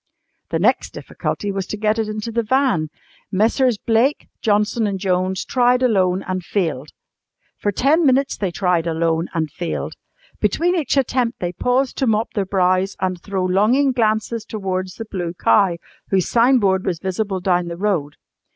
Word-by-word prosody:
The 165 - 0
next 220 +10 +1
difficulty 205 - -4
was 195 -1 -3
to 210 - -4
get 215 +1 +1
it 220 - 0
into 215 +2 -4
the 235 +1 0
van. 230 - +1 0.4
Messrs. 225 +4 +2
Blake, 235 +7 +1
Johnson 210 +1 +1
and 200 -1 -2
Jones 185 0 -1
tried 250 0 +2
alone 190 -6 +2
and 185 -1 -2
failed. 160 -7 -2 0.7
For 205 - 0
ten 285 - +2
minutes 275 -1 +2
they 195 - -2
tried 175 -2 0
alone 165 0 0
and 160 -3 -1
failed. 175 - -4 0.5
Between 355 +2 +1
each 295 -5 0
attempt 250 -2 0
they 175 0 -3
paused 250 +7 0
to 265 - +1
mop 220 +1 0
their 200 -3 -1
brows 185 0 +1
and 185 -2 -2
throw 190 -2 -2
longing 220 +10 +3
glances 220 -1 0
towards 185 -4 -4
the 225 - -6
Blue 180 -5 -4
Cow, 190 -2 +3 0.3
whose 190 -2 +1
signboard 230 -6 +3
was 185 -4 -1
visible 190 +2 -2
down 180 -1 +1
the 170 0 -5
road. 175 -8 -1
200 Hz, 165 wpm, -20 LUFS, 185-235 Hz, 0.7 s, longing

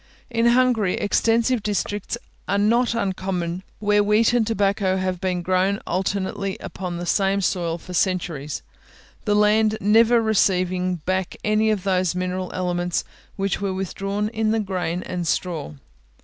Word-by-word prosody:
In 230 0 +2
Hungary, 235 -5 +3
extensive 230 +3 +2
districts 205 +1 -2 0.3
are 200 - +1
not 235 +4 +2
uncommon 185 -4 -2 0.2
where 205 0 +2
wheat 215 +3 +3
and 235 -3 +2
tobacco 200 -3 +1
have 185 -1 -2
been 180 -2 -1
grown 185 +3 +1
alternately 190 +1 -2
upon 180 -2 -5
the 175 - -4
same 195 +2 +2
soil 175 -3 -1
for 180 +2 -10
centuries, 165 -6 -1 0.6
the 205 - +2
land 215 +1 +3
never 225 +4 +5
receiving 185 -4 +1
back 185 -1 -1
any 215 +1 +2
of 210 -4 0
those 185 -3 +1
mineral 185 0 -2
elements 175 -1 -1 0.3
which 195 0 -1
were 195 -2 -1
withdrawn 195 +2 -2
in 220 -1 -1
the 220 +1 +2
grain 180 -4 -2
and 175 -2 -4
straw. 165 - -2
195 Hz, 145 wpm, -23 LUFS, 180-215 Hz, 0.6 s, never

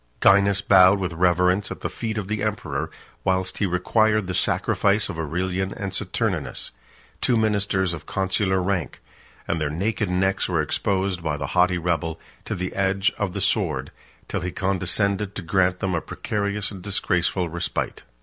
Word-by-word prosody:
Gainas 100 0 +5
bowed 95 0 +7
with 90 -3 -3
reverence 90 +3 +2
at - - -7
the - - -1
feet 110 -1 -4
of 105 -3 -3
the 105 0 -2
emperor, 100 -10 -2 0.3
whilst 95 0 0
he 100 - +2
required 105 +4 +2
the 90 - -3
sacrifice 100 +4 +2
of 85 -5 -5
Aurelian 90 +4 -1
and 100 -1 -4
Saturninus, 90 - -2 0.5
two 120 - +3
ministers 100 -4 +1
of 80 - -8
consular 95 0 +1
rank; 90 -4 -2 0.5
and 85 -1 -1
their 75 - 0
naked 100 +5 -1
necks 95 +2 +1
were 85 -3 +1
exposed, 95 +3 0
by 80 -2 -1
the 70 - -3
haughty 90 0 +4
rebel, 80 -1 -1 0.3
to - - -3
the 90 +1 -4
edge 95 +2 +1
of 100 -3 -1
the - - -3
sword, - - 0 0.4
till - - -2
he 90 - -2
condescended 100 +2 0
to 100 - -4
grant 90 +1 +1
them 95 -1 0
a 85 - 0
precarious 105 0 -2
and 95 -3 -8
disgraceful 90 -2 0
respite. 85 +1 -3
95 Hz, 170 wpm, -24 LUFS, 90-100 Hz, 0.5 s, bowed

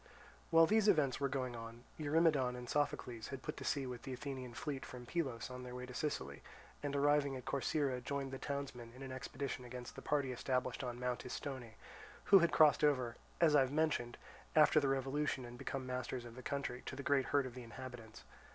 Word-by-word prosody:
While 165 0 +7
these 215 +4 +3
events 150 -10 +4
were 140 -1 +1
going 130 -2 -2
on, 115 +1 -8 0.2
Eurymedon 150 -4 +3
and 125 0 -7
Sophocles 125 -5 -1
had 135 -2 -6
put 150 - -4
to - - -6
sea 140 -2 0
with 125 -2 -5
the 130 - -5
Athenian 130 -2 -5
fleet 140 -1 -3
from 125 -1 -8
Pylos 130 -5 -2
on 125 0 -6
their 125 0 -7
way 125 0 -5
to 125 - -9
Sicily 70 - -3 0.4
and, 145 -1 -2
arriving 145 -1 +3
at 130 - -7
Corcyra, 140 -2 0
joined 140 0 -2
the 135 - -5
townsmen 130 -5 -4
in 135 - -9
an 135 - -6
expedition 130 0 -4
against 125 0 -7
the - - -7
party 140 -3 +1
established 125 0 -1
on 120 -1 -4
Mount 125 -1 -1
Istone, 125 -3 -5 0.6
who 195 - +12
had 170 -2 +3
crossed 155 -1 +6
over, 130 -5 +3 0.2
as 160 -3 +5
I - - +8
have 130 -1 +2
mentioned, 145 -6 +1 0.4
after 155 0 +7
the 140 - +1
revolution 135 0 0
and 120 0 -9
become 130 +2 -4
masters 125 -1 -3
of 120 - -9
the 130 - -8
country, 130 -2 -3
to - - -4
the 140 - -6
great 140 -1 +3
hurt 145 -2 +2
of 130 - -6
the 125 - -7
inhabitants. 120 -2 -9
130 Hz, 210 wpm, -37 LUFS, 125-145 Hz, 0.6 s, who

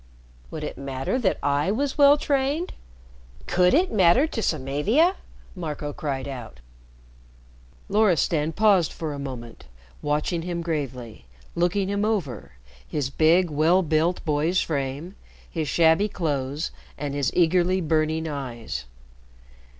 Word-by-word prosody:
"Would - - -6
it - - -6
matter 135 - -2
that 205 -7 +1
I 145 +3 +1
was 270 +7 -1
well 285 0 +6
trained? 285 +4 -1 0.7
Could 180 0 +3
it 365 +5 +2
matter 195 - +5
to 270 -8 -4
Samavia?" 170 - +1 0.4
Marco 150 -4 -5
cried 140 -3 -3
out. 120 - -8 1.3
Loristan 175 -6 +2
paused 200 -3 +3
for 155 -3 -5
a 140 - -6
moment 125 -4 -8 0.4
watching 150 +3 -1
him 170 0 -4
gravely 125 - -5 0.3
looking 180 +3 +1
him 200 +1 -1
over 180 - -2 0.3
his 140 -3 -2
big, 165 +4 +3
well 165 +6 +3
built 160 +3 0
boy's 155 +4 +1
frame, 145 +4 -3 0.3
his 160 -3 -3
shabby 165 - +3
clothes, 145 -4 -2 0.3
and 145 -1 -4
his 140 -3 0
eagerly 180 +2 +3
burning 160 -1 0
eyes. 120 - -5
160 Hz, 125 wpm, -24 LUFS, 140-185 Hz, 1.3 s, well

